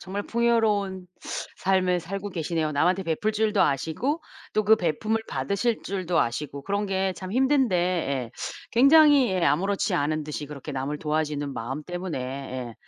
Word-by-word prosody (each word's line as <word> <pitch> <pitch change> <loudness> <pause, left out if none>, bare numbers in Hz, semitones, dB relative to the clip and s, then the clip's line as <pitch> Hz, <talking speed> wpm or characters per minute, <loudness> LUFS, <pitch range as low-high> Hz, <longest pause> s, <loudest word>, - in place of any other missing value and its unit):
정말 200 +2 -4
풍요로운 210 -6 +1 0.5
삶을 185 -1 +2
살고 195 +4 -5
계시네요. 160 -2 -1
남한테 180 +6 +2
베풀 175 +6 -1
줄도 215 -1 +1
아시고 165 - 0 0.3
또 215 - +2
그 220 +2 +6
베풂을 215 +6 0
받으실 200 - -1
줄도 185 -3 0
아시고 140 +4 -3
그런 200 +4 -1
게 190 0 0
참 185 +2 -7
힘든데 265 -5 +3
예. 160 -9 -1 0.4
굉장히 275 -1 +6
예 185 -2 0
아무렇지 195 +6 +1
않은 155 +2 0
듯이 150 0 -5
그렇게 150 0 -8
남을 135 +3 -3
도와주는 150 -2 -1
마음 130 +6 -4
때문에 175 -2 -4
예. 130 -2 -5
180 Hz, 335 characters per minute, -26 LUFS, 150-210 Hz, 0.5 s, 그